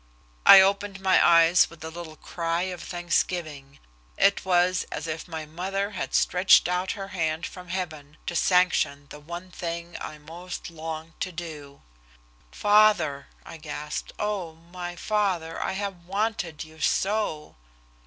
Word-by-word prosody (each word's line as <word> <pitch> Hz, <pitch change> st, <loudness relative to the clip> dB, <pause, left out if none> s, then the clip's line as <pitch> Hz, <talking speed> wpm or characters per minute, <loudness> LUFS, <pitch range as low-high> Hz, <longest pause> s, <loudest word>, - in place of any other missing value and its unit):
I 195 Hz, -, +12 dB
opened 200 Hz, 0 st, +1 dB
my 190 Hz, -1 st, +4 dB
eyes 170 Hz, +1 st, +6 dB
with 165 Hz, -2 st, -13 dB
a 160 Hz, -, -6 dB
little 165 Hz, -2 st, -8 dB
cry 170 Hz, +1 st, -2 dB
of 180 Hz, -2 st, -5 dB
thanksgiving. 170 Hz, -5 st, -2 dB, 0.4 s
It 200 Hz, -, +3 dB
was 180 Hz, 0 st, +2 dB
as 150 Hz, -, -4 dB
if 160 Hz, +1 st, -5 dB
my 160 Hz, -2 st, -6 dB
mother 190 Hz, +6 st, -3 dB
had 205 Hz, -, -4 dB
stretched 180 Hz, 0 st, +5 dB
out 180 Hz, +1 st, -1 dB
her 195 Hz, -1 st, -7 dB
hand 165 Hz, -3 st, -2 dB
from 180 Hz, -1 st, -9 dB
heaven 155 Hz, -5 st, -5 dB
to 175 Hz, -, -4 dB
sanction 175 Hz, -6 st, +2 dB
the 150 Hz, -, -9 dB
one 170 Hz, +4 st, -8 dB
thing 170 Hz, 0 st, -5 dB
I 155 Hz, -, -6 dB
most 170 Hz, +4 st, -8 dB
longed 160 Hz, 0 st, -7 dB
to 185 Hz, -, -3 dB
do. 155 Hz, -5 st, -9 dB, 0.7 s
"Father!" 205 Hz, -, +3 dB, 0.2 s
I 165 Hz, -, -9 dB
gasped. 150 Hz, -1 st, -6 dB
"Oh, 200 Hz, -6 st, -2 dB, 0.2 s
my 175 Hz, -1 st, -6 dB
father, 185 Hz, -5 st, -1 dB
I -, -, -1 dB
have 190 Hz, -3 st, -5 dB
wanted 195 Hz, -5 st, -2 dB
you 160 Hz, 0 st, -15 dB
so." 195 Hz, -5 st, -1 dB
175 Hz, 145 wpm, -26 LUFS, 160-190 Hz, 0.7 s, I